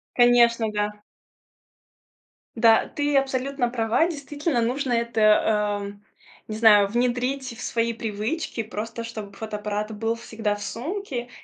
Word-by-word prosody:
Конечно, 235 -2 +4
да. 210 0 -1 1.6
Да, 225 -1 +5
ты 290 -1 0
абсолютно 270 -1 0
права. 235 +6 +1
Действительно, 290 -4 -2
нужно 255 +2 -1
это, 235 -1 0 0.6
эм, 200 0 -9 0.4
не 215 - -5
знаю, 210 -2 +6
внедрить 250 +2 -1
в - - -9
свои 230 0 0
привычки, 225 +5 -3
просто 225 +2 -5
чтобы 220 -3 -7
фотоаппарат 210 0 -4
был 225 +1 -1
всегда 220 -2 -3
в 205 - -10
сумке, 260 - -4
235 Hz, 120 wpm, -24 LUFS, 220-255 Hz, 1.6 s, знаю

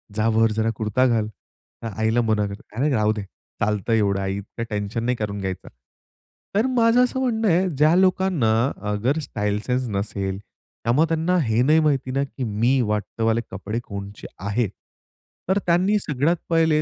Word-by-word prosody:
"जा 110 +1 +1
वर 115 0 +4
जरा 110 +1 0
कुर्ता 110 +4 +1
घाल." 115 -3 +1 0.6
तर - - -2
आईला 110 +2 +2
मना 110 -2 +1
करते, 100 0 -8 0.2
"अरे 145 +3 +2
राहू 110 -4 +2
दे, 105 - -4 0.4
चालतं 105 +1 0
एवढं 100 -3 +2
आई, 95 0 -2
इतकं 105 +3 -6
टेन्शन 105 +2 -3
नाही 125 +1 +1
करून 105 -2 -3
घ्यायचा." 95 -1 -5 0.9
तर 215 +4 +3
माझं 230 +1 +5
असं 250 +1 -1
म्हणणं 230 -4 0
आहे 185 +1 +3
ज्या 155 +1 +3
लोकांना 185 -9 +2 0.4
अगर 120 +9 0
स्टाईल 105 -3 -2
सेन्स 125 0 0
नसेल 100 -1 -2
त्यामुळे 120 +7 -2
त्यांना 165 +3 +1
हे 110 -1 +1
नाही 155 +4 +5
माहिती 140 -4 +1
ना 135 +2 +1
की 135 -1 -6
मी 120 +4 +1
वाटत 105 +2 -3
वाले 115 +1 +2
कपडे 100 +4 -4
कोणचे 100 -1 -8 0.2
आहेत. 105 +1 0 0.8
तर 190 +2 +3
त्यांनी 180 +5 +3
सगळ्यात 150 0 0
पहिले 160 -2 +3
115 Hz, 170 wpm, -23 LUFS, 105-160 Hz, 0.9 s, माझं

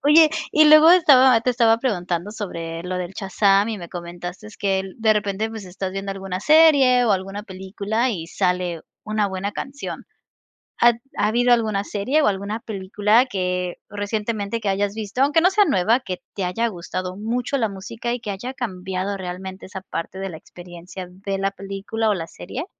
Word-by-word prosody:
Oye, 305 +2 +6 0.2
y 310 - +5
luego 310 +2 +8
estaba 265 -8 +7
te 250 - +2
estaba 230 -2 +4
preguntando 180 -6 -2
sobre 165 -6 -5
lo 180 +1 -4
del 180 0 -4
Shazam 195 +1 +2
y 220 - -3
me 170 -2 -8
comentaste 175 +3 -7
que 195 -1 0
de 220 -2 +3
repente, 210 +1 -1
pues, 220 -2 -7
estás 185 +1 -5
viendo 195 +1 -4
alguna 190 -1 -5
serie 285 -3 +6
o 220 - +3
alguna 195 +2 -3
película 200 +5 -2
y 170 -7 -4
sale 180 -2 -1 0.2
una 215 -1 0
buena 190 +2 -4
canción. 275 +5 -6 0.7
¿Ha 240 0 +6 0.2
habido 240 +3 +3
alguna 215 -4 -1
serie 215 +10 0
o 300 - +3
alguna 200 +2 -1
película 210 +2 +1
que 180 -6 -2
recientemente 210 +1 -3
que 205 - -2
hayas 200 +1 0
visto? 220 +3 -2
Aunque 290 +4 +4
no 355 - +5
sea 415 +1 +4
nueva, 220 - +2
¿qué 185 -6 -6
te 195 - -2
haya 225 +6 0
gustado 185 -1 -5
mucho 240 +6 -2
la 225 -5 0
música 230 +5 -5
y 245 - -3
que 210 - -5
haya 200 +6 -5
cambiado 190 -4 -4
realmente 185 0 -7
esa 190 - -7
parte 190 0 -6
de 195 - -3
la 170 - -8
experiencia 175 +2 -10
de 195 +2 -5
la 195 0 0
película 200 +3 -3
o - - +2
la 165 -4 -4
serie? 245 - -7
200 Hz, 180 wpm, -22 LUFS, 185-230 Hz, 0.7 s, luego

